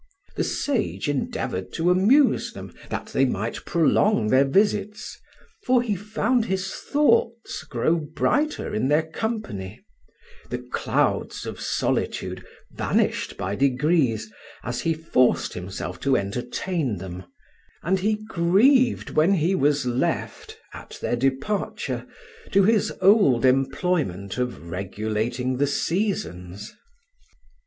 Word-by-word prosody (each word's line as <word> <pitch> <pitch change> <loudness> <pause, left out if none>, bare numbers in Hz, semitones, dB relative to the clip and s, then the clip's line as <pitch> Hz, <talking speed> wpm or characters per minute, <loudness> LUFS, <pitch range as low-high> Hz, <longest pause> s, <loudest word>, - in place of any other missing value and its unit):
The - - 0
sage 260 - -1
endeavoured 130 -9 -2
to 170 +2 +2
amuse 235 +11 +3
them, - - -9 0.2
that - - -4
they - - +3
might - - -2
prolong 165 - +2
their 130 +3 +5
visits, 205 +6 0 0.5
for 250 -1 +4
he 215 -4 -1
found 220 +4 0
his 190 -2 -2
thoughts 235 -5 +1
grow 140 +7 0
brighter 165 - -1
in 110 +5 0
their 150 +3 +3
company; 160 - -5 0.7
the 125 - -2
clouds 125 0 -1
of - - -6
solitude - - -2 0.3
vanished - - -1
by 95 +1 -3
degrees 130 -4 +1 0.3
as 120 0 -3
he 165 -1 0
forced 155 -6 +1
himself 90 0 -6
to 135 -1 +2
entertain 125 - -2
them, 90 0 -8 0.6
and 190 +3 +1
he 215 +3 +1
grieved 225 +8 +3
when 165 +6 +3
he 175 +2 +1
was 145 -5 +2
left, 125 +1 -2 0.2
at - - -10
their - - -1
departure, 135 - -2 0.4
to 195 - +5
his 215 +1 +3
old 185 - +5
employment 135 - 0
of 120 -9 -4
regulating 110 +7 -2
the 145 +2 +2
seasons. 105 - -2
150 Hz, 115 wpm, -24 LUFS, 120-200 Hz, 0.7 s, their